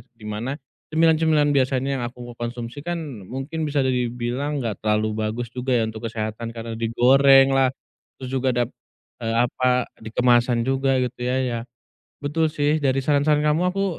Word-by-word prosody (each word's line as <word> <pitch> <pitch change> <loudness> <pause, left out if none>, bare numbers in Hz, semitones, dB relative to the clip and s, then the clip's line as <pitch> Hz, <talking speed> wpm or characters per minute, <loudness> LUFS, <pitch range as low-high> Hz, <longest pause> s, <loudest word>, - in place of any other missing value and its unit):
Di 110 - -14
mana, 115 +6 -3 0.4
cemilan-cemilan 160 -2 +3
biasanya 130 0 +1
yang - - -3
aku 120 0 -10
konsumsi 120 +3 -5
kan 175 0 -2 0.3
mungkin 140 - -4
bisa 145 -1 +1
dibilang 125 +3 -1
nggak 110 -4 -4
terlalu 110 0 +1
bagus 115 +1 -4
juga 130 0 -1
ya 115 - +2
untuk 110 +1 -7
kesehatan, 110 +1 -4
karena 115 0 -5
digoreng 135 +4 +5
lah. 135 -1 +4 0.5
Terus 130 - -5
juga 130 0 0
dap 120 -1 +1 0.5
eee, 115 0 -1
apa, 125 +1 +1
di 110 - -7
kemasan 120 -1 +3
juga 135 0 +2
gitu 125 0 -5
ya, 125 +1 0
ya. 120 -2 -2 0.7
Betul 160 +3 +1
sih, 150 0 +1
dari 135 0 +2
saran-saran 150 0 +3
kamu, 150 +3 +2
aku 195 0 0
125 Hz, 165 wpm, -23 LUFS, 120-140 Hz, 0.7 s, digoreng